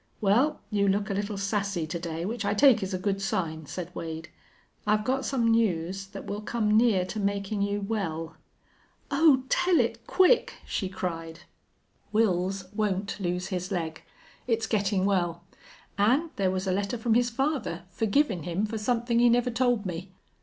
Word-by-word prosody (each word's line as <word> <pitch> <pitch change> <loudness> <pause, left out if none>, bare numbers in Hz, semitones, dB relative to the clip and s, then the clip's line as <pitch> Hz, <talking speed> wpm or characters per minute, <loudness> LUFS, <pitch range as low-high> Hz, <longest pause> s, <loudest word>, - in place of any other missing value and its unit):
"Well, 245 +10 +2
you 200 -1 +2
look 200 +2 +1
a - - 0
little 200 +1 -2
sassy 200 -3 -1
to 160 +2 -4
day, 165 0 -4
which 225 +3 -3
I - - 0
take 260 0 +6
is 190 0 -3
a 185 - -1
good 195 +1 -1
sign," 160 -5 -2
said 180 +2 -6
Wade. 160 0 -6 0.6
"I've 210 0 +3
got 265 +1 0
some 235 -4 +1
news 195 -4 0
that 195 - -9
will 205 +1 -4
come 215 -1 0
near 220 -5 +4
to 200 +4 -5
makin' 200 0 -1
you 200 0 0
well." 165 -6 -3 0.8
"Oh, 280 -3 +5
tell 355 +3 +3
it - - -1
quick!" 375 +6 +4
she 190 - -2
cried. 165 -3 -5 0.7
"Wils 190 -2 0
won't 205 -1 -1
lose 180 0 -2
his 185 0 -3
leg. 160 -4 -3 0.5
It's 225 -2 +1
gettin' 200 -3 +1
well. 175 -4 0 0.6
An' 265 +11 +3
there 195 -5 +1
was 185 +1 -2
a 190 - 0
letter 200 +4 -1
from 225 0 +1
his 240 +1 +3
father, 245 - -2
forgivin' 220 - +1
him 175 +6 -1
for 220 +1 -4
somethin' 235 +1 +1
he 240 0 +6
never 245 +1 +2
told 240 -3 +1
me." 180 +1 -5
200 Hz, 175 wpm, -27 LUFS, 185-230 Hz, 0.8 s, take